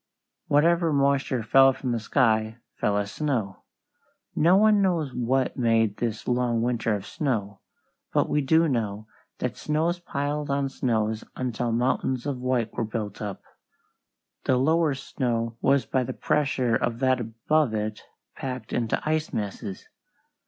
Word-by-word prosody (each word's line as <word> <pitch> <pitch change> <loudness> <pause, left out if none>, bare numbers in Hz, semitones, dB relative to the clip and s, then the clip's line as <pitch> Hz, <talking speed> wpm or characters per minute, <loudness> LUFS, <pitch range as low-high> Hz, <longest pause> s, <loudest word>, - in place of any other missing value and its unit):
Whatever 165 +3 +3
moisture 140 -3 +1
fell 135 +4 +6
from 130 -1 -4
the 120 - 0
sky 110 -1 +1 0.2
fell 100 0 0
as 100 -1 -2
snow. 120 -11 -2 0.7
No 175 +4 +5
one 210 0 +5
knows 165 -8 0
what 125 +2 0
made 115 -4 +2
this 115 -3 -3
long 120 -2 +1
winter 115 -3 0
of 100 - -6
snow, 105 - -2 0.5
but - - +2
we 150 - +1
do 160 +4 +3
know 110 -6 -2 0.3
that - - -3
snows 160 +3 0
piled 145 -2 -3
on 140 0 0
snows 110 -4 -1
until 120 -2 -2
mountains 125 +1 0
of 140 -3 -2
white 125 -3 -1
were - - -2
built 110 -1 -4
up. 100 -3 -5 1.0
The 130 - +3
lower 155 +2 +2
snow 115 -4 -2
was 140 0 +3
by 130 - 0
the - - -4
pressure 140 -6 +1
of 115 0 -1
that 130 -1 +3
above 115 +3 0
it 105 0 -3 0.3
packed 125 -4 -6
into 115 -2 0
ice 155 0 0
masses. 100 -2 -5
125 Hz, 145 wpm, -26 LUFS, 115-145 Hz, 1.0 s, fell